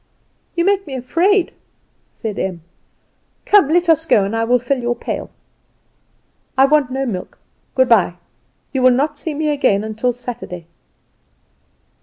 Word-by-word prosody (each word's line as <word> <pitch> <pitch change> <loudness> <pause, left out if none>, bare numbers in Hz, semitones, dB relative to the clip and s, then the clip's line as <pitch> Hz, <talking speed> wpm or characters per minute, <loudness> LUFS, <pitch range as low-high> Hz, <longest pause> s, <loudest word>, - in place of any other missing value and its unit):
"You 340 0 +1
make 395 0 +1
me 270 - -5
afraid," 340 +10 +1 0.6
said 215 -4 -5
Em. 180 -4 -3 0.8
"Come, 405 -9 +5
let 350 +2 +2
us 325 0 +3
go, 205 - +4
and 200 +3 -2
I 225 - 0
will 245 +2 +3
fill 250 +2 -1
your 240 0 -1
pail." - - -5 1.3
"I 265 - +7
want 285 -2 +3
no 265 +1 -2
milk. 190 -7 -5 0.4
Good 260 -1 +4
bye! 190 -7 +4 0.6
You 265 - 0
will 255 - +6
not 285 +4 0
see 315 -3 -4
me 305 +1 -1
again 220 -7 +1
till 245 +3 0
Saturday." 235 -8 -7
255 Hz, 150 wpm, -18 LUFS, 225-305 Hz, 1.3 s, I